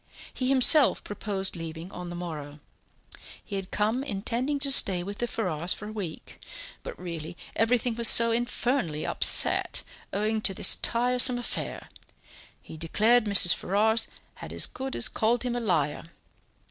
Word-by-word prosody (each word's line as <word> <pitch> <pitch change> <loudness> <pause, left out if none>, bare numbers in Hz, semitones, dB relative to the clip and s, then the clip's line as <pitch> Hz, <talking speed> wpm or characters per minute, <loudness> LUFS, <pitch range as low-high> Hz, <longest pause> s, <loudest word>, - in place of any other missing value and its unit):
He 255 0 -3
himself 275 +2 +4
proposed 200 -2 -4
leaving 165 +2 -8
on 180 0 -8
the 175 - -8
morrow; 155 -4 -8 0.9
he 200 - -7
had 195 -1 -6
come 220 +5 -2
intending 245 +5 -3
to 280 -1 +1
stay 190 -9 +4
with 200 +2 -8
the 240 - -1
Ferrars 180 -7 -2
for 210 - -9
a - - -8
week, 195 -7 -8 0.4
but - - -9
really 170 -2 -8 0.2
everything 235 +1 0
was 235 0 +2
so 230 +1 +5
infernally 240 - -2
upset, - - +3 0.3
owning 215 +2 -2
to 195 -2 -1
this - - +7
tiresome 250 +1 +3
affair 245 - -6 0.8
he 160 - -12
declared 215 +9 +1
Mrs. 200 -4 +6
Ferrars 220 +4 0 0.3
had - - -11
as - - 0
good 265 0 -7
as - - +3
called 230 +2 -1
him 245 -1 -3
a - - -2
liar! 165 -11 -2
215 Hz, 155 wpm, -26 LUFS, 175-240 Hz, 0.9 s, this